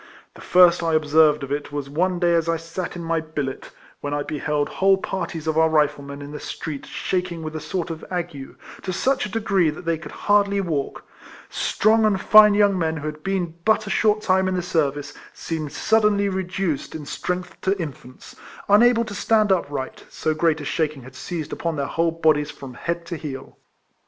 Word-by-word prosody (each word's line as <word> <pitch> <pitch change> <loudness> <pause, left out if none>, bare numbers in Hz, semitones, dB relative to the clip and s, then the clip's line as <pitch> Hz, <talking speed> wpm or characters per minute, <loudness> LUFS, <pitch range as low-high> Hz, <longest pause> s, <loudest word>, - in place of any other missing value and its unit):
The - - -14
first 180 -1 +5
I 165 -1 +1
observed 155 -1 +4
of 135 - -6
it 145 0 -3
was 145 -1 -4
one 180 +6 0
day 175 -1 +2
as 165 -1 +1
I 165 - +1
sat 165 +3 -6
in 175 - -6
my 165 0 0
billet, 150 -4 -5 0.3
when 145 0 -3
I 145 - -1
beheld 150 0 -1
whole 195 0 +3
parties 190 -4 -4
of 160 0 +1
our 160 0 +4
Riflemen 145 -2 0
in 145 - -9
the 150 - -6
street 150 -4 -6
shaking 180 -3 -3
with 155 0 -6
a - - -2
sort 170 +2 -3
of 160 - -7
ague, 175 -7 -5 0.3
to 185 - -4
such 260 +6 0
a - - -12
degree 200 -6 +2
that 150 +3 -7
they 165 -1 0
could 170 - -9
hardly 200 -1 +3
walk; 155 -8 -3 0.5
strong 220 +2 +2
and 210 -3 +2
fine 210 +1 +7
young 205 -2 +3
men 160 -1 0
who 150 - -6
had 155 0 -5
been 185 -2 -2
but 220 +1 +2
a - - -4
short 215 -1 +2
time 190 -2 +2
in 185 - 0
the 180 - -1
service 145 -4 -1 0.2
seemed 155 -3 -4
suddenly 210 +3 +2
reduced 185 -6 -2
in 155 -2 -6
strength 180 +4 -4
to 195 +1 0
infants, 130 -6 -8 0.3
unable 230 +3 +5
to 215 - -7
stand 210 +1 +2
upright 145 -7 -2
— - - -25
so 155 - -1
great 160 0 +1
a 145 - -6
shaking 150 -2 -2
had 130 +1 -12
seized 155 +3 -5
upon 165 -1 -2
their 140 -2 -1
whole 165 +3 0
bodies 155 -3 +2
from 135 -3 -9
head 170 +5 -4
to 170 - -5
heel. 135 -4 -7
165 Hz, 205 wpm, -23 LUFS, 150-190 Hz, 0.5 s, fine